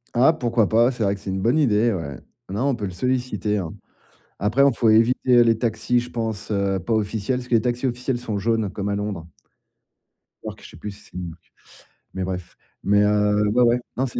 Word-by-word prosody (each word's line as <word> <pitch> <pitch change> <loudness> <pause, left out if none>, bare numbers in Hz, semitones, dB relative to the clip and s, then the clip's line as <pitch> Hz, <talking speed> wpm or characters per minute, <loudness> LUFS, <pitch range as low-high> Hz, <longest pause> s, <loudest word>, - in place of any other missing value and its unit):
Ah, 130 +6 +6
pourquoi 120 -8 +1
pas? 115 +3 +4
C'est 120 -3 -7
vrai 100 0 +1
que 100 - -13
c'est 95 - -4
une 95 - -2
bonne 120 +9 +2
idée, 115 -5 +3
ouais. 80 - -5 0.3
Non, 105 +8 -1
on 135 - +1
peut 105 -4 -4
le 95 - -4
solliciter, 125 0 -1
hein. 85 -3 -4 0.7
Après, 110 +7 +2
hein, 140 - +5
faut 115 - +2
éviter, 115 +3 +4
heu, 120 - +8
les 115 -1 +3
taxis, 115 +1 0
je 120 - -8
pense, 110 -3 -4
heu, 100 -2 0
pas 115 +6 -3
officiels, 110 +3 0
parce 125 - -7
que 120 - +1
les 110 - +5
taxis 125 +1 -1
officiels 125 0 -2
sont 115 -4 -4
jaunes 110 -1 0
comme 100 0 -3
à 100 - -1
Londres. 100 -5 -4 1.2
New-York, - - -7
je - - -11
sais - - -14
plus 105 +6 -6
si 100 - -13
c'est - - -15
New-York, 85 -2 -8 0.6
mais 95 - -3
bref. 90 -1 -5 0.3
Mais 100 +1 +3
heu, 105 0 +2
ouais, 120 +4 +2
ouais, 120 +1 +4 0.2
non 130 - +1
c'est 125 - -4
110 Hz, 230 wpm, -23 LUFS, 100-120 Hz, 1.2 s, heu